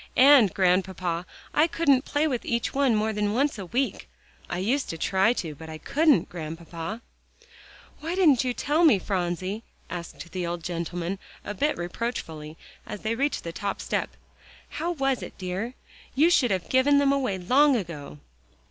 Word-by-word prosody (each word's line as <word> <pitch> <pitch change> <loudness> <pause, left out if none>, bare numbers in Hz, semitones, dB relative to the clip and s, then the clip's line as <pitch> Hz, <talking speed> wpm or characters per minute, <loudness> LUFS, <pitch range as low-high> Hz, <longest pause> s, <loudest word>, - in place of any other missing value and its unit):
And, 260 -6 +7
Grandpapa, 180 -2 0 0.3
I 310 - +4
couldn't 285 -5 +2
play 295 +2 +1
with 255 -5 -2
each 235 -1 -1
one 270 -4 +3
more 215 +1 +1
than 210 0 0
once 270 -1 +1
a 190 - -6
week. 255 +8 -2 0.4
I - - -2
used 245 +10 0
to 165 - -4
try 190 +6 +3
to, 165 -10 -4
but 160 +2 -11
I 155 - -6
couldn't, 290 - +3
Grandpapa." 165 +5 -6 1.0
"Why 325 +4 -3
didn't 305 -10 +5
you 255 - 0
tell 295 +7 +1
me, 300 -11 +7
Phronsie," 185 +2 -2 0.3
asked 170 0 -7
the 180 -2 -3
old 170 -1 -4
gentleman 175 +2 -3 0.3
a 205 - -3
bit 290 +9 0
reproachfully 165 -5 -5 0.3
as 210 - -6
they 220 - -1
reached 280 +5 -1
the 170 - -4
top 200 +2 -3
step, - - -1 0.6
"how 335 +3 -2
it - - -16
was, 270 -2 0
dear? 190 +7 -4 0.4
You 315 +6 +5
should 255 -8 +4
have 190 -4 -1
given 265 +2 +4
them 280 -1 +4
away 260 -8 0
long 265 +10 +4
ago." 165 - -5
210 Hz, 170 wpm, -26 LUFS, 175-275 Hz, 1.0 s, And